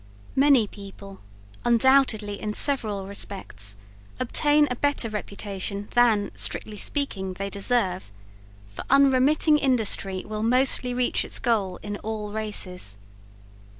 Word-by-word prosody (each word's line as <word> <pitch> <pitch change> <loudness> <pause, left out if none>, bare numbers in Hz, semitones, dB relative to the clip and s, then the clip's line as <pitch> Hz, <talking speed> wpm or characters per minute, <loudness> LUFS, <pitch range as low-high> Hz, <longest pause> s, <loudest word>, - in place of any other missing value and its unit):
Many 270 -4 +4
people, 200 -1 -12 0.4
undoubtedly 235 -4 +3
in 210 0 -4
several 215 -9 +2
respects, 185 - -4 0.4
obtain 295 +4 +2
a - - -1
better 285 -3 0
reputation 200 -1 -5
than, 225 -4 +3
strictly 210 -1 -1
speaking, 195 -9 -3
they 195 +2 -5
deserve, 195 - -1 0.5
for 100 0 -9
unremitting 275 +3 +4
industry 215 -8 +1
will 215 0 -5
mostly 250 +1 +2
reach 250 0 0
its - - -2
goal 200 -6 -1
in 205 -1 -5
all 215 -1 -5
races. 185 - -2
215 Hz, 115 wpm, -24 LUFS, 200-255 Hz, 0.5 s, Many